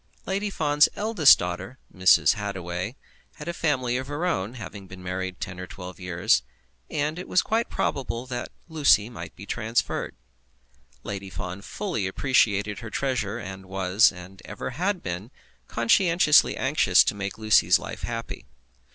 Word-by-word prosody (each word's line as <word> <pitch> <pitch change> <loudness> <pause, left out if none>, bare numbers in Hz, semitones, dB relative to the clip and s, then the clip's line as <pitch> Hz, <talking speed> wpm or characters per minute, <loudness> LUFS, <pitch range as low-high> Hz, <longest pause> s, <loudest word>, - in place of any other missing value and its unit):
Lady 200 +2 -1
Fawn's 150 -5 +3
eldest 205 -9 +6
daughter, 90 +7 -5 0.2
Mrs. 95 0 +5
Hittaway, 95 0 -4 0.4
had 150 - -9
a 170 - -2
family 130 -7 0
of 130 +1 -5
her 145 +4 -3
own, 110 - -1
having 100 -3 -9
been 95 0 -11
married 90 0 -4
ten 90 0 -6
or 90 - -6
twelve 90 0 -9
years, 90 - +2 0.5
and 155 +2 -2
it 180 - -7
was 180 - +3
quite 230 +1 0
probable 125 -2 -2
that 125 -1 -5 0.2
Lucy 140 - +3
might 85 -7 -9
be 100 - -10
transferred. 115 +2 -2 0.9
Lady 100 -1 -5
Fawn 95 -1 -6
fully 170 - -3
appreciated 105 -3 +1
her 115 - -7
treasure, 120 -5 -1
and 95 -3 -8
was, 95 +2 +3
and 95 +1 -12
ever - - -6
had 180 +8 -1
been, 90 +5 -5 0.4
conscientiously 160 +6 +4
anxious 130 - +4
to - - 0
make 100 -1 -5
Lucy's 110 -1 +4
life - - -8
happy. 115 -4 -5
110 Hz, 150 wpm, -25 LUFS, 95-145 Hz, 0.9 s, eldest